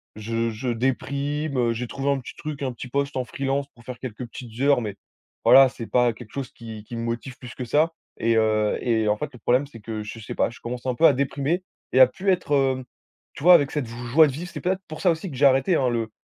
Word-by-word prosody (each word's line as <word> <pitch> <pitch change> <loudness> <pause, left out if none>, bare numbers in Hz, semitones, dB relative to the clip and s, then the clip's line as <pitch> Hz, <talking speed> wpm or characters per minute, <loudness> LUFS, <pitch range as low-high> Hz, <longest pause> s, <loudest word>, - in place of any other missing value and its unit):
je 115 +2 -2
je 115 +4 -5
déprime, 140 +4 -1
heu, 120 -2 +2
j'ai 120 +2 -4
trouvé 135 +3 -3
un 140 - 0
petit 125 - -10
truc, 150 -2 -6
un 130 -2 -2
petit 120 - -8
poste 140 +2 -1
en 130 - 0
freelance 135 +2 -2
pour 120 - -19
faire 125 -1 -8
quelques 125 -1 -6
petites 115 0 -10
heures 140 -2 +4
mais 105 -3 -4 0.5
voilà, 135 -1 +8
c'est 115 -2 -8
pas 125 -1 +3
quelque 110 -1 -13
chose 135 -2 -5
qui 110 -2 -9
qui 120 - -8
me 115 - -3
motive 120 +3 -4
plus 125 -3 -10
que 130 - -5
ça 155 +6 +2 0.2
et 115 0 +1
heu 110 -1 +2
et 110 -3 +1
en 105 - +3
fait 150 - -4
le 125 - -12
problème 125 +5 +2
c'est 120 -4 -12
que 110 0 -5
je 110 +2 -8
sais 110 - -7
pas, - - +2
je 120 - -13
commence 120 +1 -6
un 130 -1 0
peu 165 - +4
à - - +5
déprimer 140 +6 -1 0.3
et 130 - +4
à 130 - +10
plus 190 +10 -3
être, 180 -5 +1
heu, 135 -2 +2 0.5
tu - - -9
vois, 180 +2 +9
avec 145 -5 +5
cette 145 -5 -2
j 115 - -9 0.2
joie 155 +4 +7
de - - -2
vivre. 170 +6 -6
C'est - - -6
peut-être 190 +1 -1
pour 155 0 -8
ça 180 - +4
aussi 165 +3 -4
que 130 - -7
j'ai 140 - +4
arrêté, 135 +6 +4
hein, 130 -5 +2
le 115 -2 -2
130 Hz, 270 wpm, -24 LUFS, 115-140 Hz, 0.5 s, à